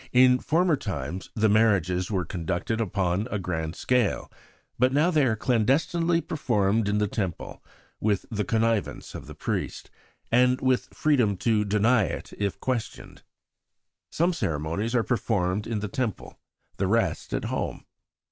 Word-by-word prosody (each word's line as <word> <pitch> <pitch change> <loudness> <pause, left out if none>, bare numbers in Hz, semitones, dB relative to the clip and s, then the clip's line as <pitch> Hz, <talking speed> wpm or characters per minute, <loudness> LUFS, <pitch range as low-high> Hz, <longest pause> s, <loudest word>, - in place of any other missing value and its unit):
In 125 0 +6
former 170 +3 +2
times 90 - -5
the 110 -1 +3
marriages 95 -5 +2
were 95 -5 -1
conducted 90 +6 -2
upon 95 0 0
a - - -2
grand 80 -3 -3
scale, 125 -5 0 0.5
but 125 +1 +4
now 150 +6 +3
they 155 -4 +3
are 110 - +1
clandestinely 150 +9 +1
performed 110 -9 0
in 105 - +1
the 105 0 +1
Temple, 95 -5 -4 0.4
with 105 -3 0
the 105 -1 -1
connivance 115 -1 -1
of - - -8
the - - -9
priest, - - -4 0.4
and 125 +2 +4
with 130 -1 +1
freedom 125 -10 +2
to 110 +1 +2
deny 105 +2 +3
it - - -6
if 100 -5 -2
questioned. 125 -4 -4 0.9
Some 175 +3 +1
ceremonies 85 - -2
are 120 - +3
performed 105 -4 0
in 110 -2 -2
the 105 - -2
Temple, 115 0 -4 0.4
the 95 - 0
rest 115 +4 0
at - - -2
home. - - -3
110 Hz, 145 wpm, -26 LUFS, 95-125 Hz, 0.9 s, In